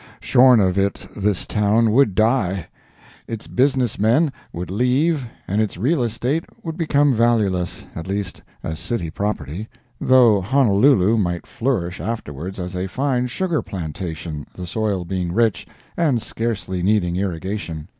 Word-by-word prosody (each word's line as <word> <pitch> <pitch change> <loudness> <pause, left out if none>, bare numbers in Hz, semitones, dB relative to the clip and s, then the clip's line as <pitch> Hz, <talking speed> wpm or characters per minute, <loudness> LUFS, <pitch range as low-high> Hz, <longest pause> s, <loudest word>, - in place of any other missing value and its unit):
Shorn 125 -1 +5
of 95 -1 +2
it 100 0 -1
this 100 -2 0
town 105 +2 +2
would 115 -5 +3
die—its 110 - -2
businessmen 130 +1 +2 0.2
would 90 +1 -6
leave 130 - +1 0.2
and 100 +3 +1
its 110 -5 -2
real 135 - +1
estate 125 +7 -1 0.2
would 160 -2 -4
become 145 -4 +2
valueless, 110 -7 +1
at 80 +1 -6
least 100 -1 -4 0.2
as 80 0 -4
city 90 -3 -3
property, 100 - -3 0.3
though 120 -6 +5
Honolulu 115 -1 +4
might 90 -4 -1
flourish 95 -9 -2
afterwards 95 -4 -5
as 90 +1 -5
a 90 +1 -2
fine 125 +3 0
sugar 170 +5 -1
plantation, 80 -3 -6
the 90 - -6
soil 100 -1 -1
being 90 -1 -2
rich, 115 -1 +1 0.3
and 150 -8 +2
scarcely 110 -5 -3
needing 90 -2 +1
irrigation. 90 -3 -3
105 Hz, 135 wpm, -21 LUFS, 90-125 Hz, 0.3 s, Shorn